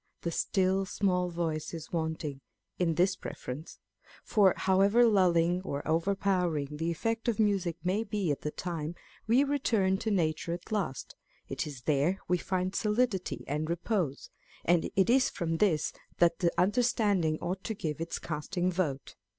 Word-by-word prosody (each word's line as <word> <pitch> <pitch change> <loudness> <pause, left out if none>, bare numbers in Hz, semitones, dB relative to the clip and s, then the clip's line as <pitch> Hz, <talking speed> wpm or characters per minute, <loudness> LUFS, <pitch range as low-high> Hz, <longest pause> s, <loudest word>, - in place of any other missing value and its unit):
" - - -48
The 170 - -1
still 190 +2 +1
small 180 -2 +1
voice 165 -2 -3
is 160 -1 -8
wanting 160 -4 -3 0.2
" - - -46
in 170 -3 +1
this 185 +3 +3
preference; 145 0 -7 0.5
for 200 -4 +4
however 200 +5 +4
lulling 180 -4 +3
or 145 -6 -4
overpowering 175 -3 +1
the 165 +2 -1
effect 225 +8 -2
of 230 -3 0
music 195 -6 +1
may 190 +5 +1
be 200 -6 -1
at 145 - -2
the 150 - -2
time, 165 0 -4 0.3
we 245 +5 +5
return 225 -9 +1
to 220 - -2
nature 170 -3 0
at 175 +4 -8
last; 200 -11 -2 0.3
it - - -3
is 135 -4 -9
there 155 +7 +1
we 180 0 +2
find 185 0 -1
solidity 210 -2 0
and 150 +3 -2
repose, 170 - -2 0.3
and 170 -1 +3
it 195 +1 +4
is 255 +2 +4
from 165 -1 -2
this 160 -6 +2 0.2
that 170 -1 +3
the 175 -2 +2
under 205 +7 +3
standing 205 -10 +2
ought 185 +4 -4
to 220 - -2
give 155 -4 -4
its 165 - -3
casting 175 +4 -2
vote. 155 -7 -2
180 Hz, 165 wpm, -30 LUFS, 160-200 Hz, 0.5 s, we